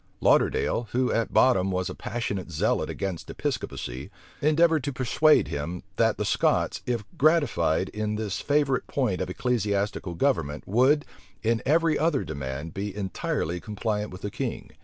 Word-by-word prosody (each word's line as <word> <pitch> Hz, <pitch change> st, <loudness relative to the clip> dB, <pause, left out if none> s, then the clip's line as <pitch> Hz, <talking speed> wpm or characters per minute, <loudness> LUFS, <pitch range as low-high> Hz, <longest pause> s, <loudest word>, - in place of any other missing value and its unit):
Lauderdale, 115 Hz, -, +2 dB
who 125 Hz, +1 st, +2 dB
at 115 Hz, -, 0 dB
bottom 95 Hz, -8 st, +4 dB
was 90 Hz, -1 st, -1 dB
a -, -, -4 dB
passionate 100 Hz, -6 st, -4 dB
zealot 80 Hz, -2 st, 0 dB
against 95 Hz, -4 st, -4 dB
Episcopacy, 65 Hz, +3 st, -4 dB, 0.3 s
endeavored 155 Hz, 0 st, +3 dB
to 140 Hz, -, -2 dB
persuade 135 Hz, +4 st, +3 dB
him, 80 Hz, +5 st, -4 dB
that -, -, +3 dB
the -, -, -1 dB
Scots, -, -, +1 dB
if 120 Hz, -3 st, -1 dB, 0.2 s
gratified 135 Hz, -, +3 dB
in 105 Hz, 0 st, -2 dB
this 105 Hz, -3 st, -3 dB
favorite 140 Hz, -3 st, +1 dB
point 125 Hz, -10 st, 0 dB
of -, -, -2 dB
ecclesiastical 100 Hz, -4 st, -1 dB
government, 75 Hz, -2 st, 0 dB
would, 130 Hz, +8 st, +3 dB, 0.4 s
in 115 Hz, 0 st, +1 dB
every 160 Hz, +1 st, +3 dB
other 155 Hz, -4 st, +2 dB
demand, 70 Hz, +3 st, -5 dB
be 100 Hz, 0 st, -4 dB
entirely 90 Hz, -3 st, -2 dB
compliant 105 Hz, +1 st, -3 dB
with 90 Hz, +1 st, -10 dB
the 105 Hz, -, -3 dB
king. -, -, -4 dB
105 Hz, 150 wpm, -26 LUFS, 90-130 Hz, 0.4 s, bottom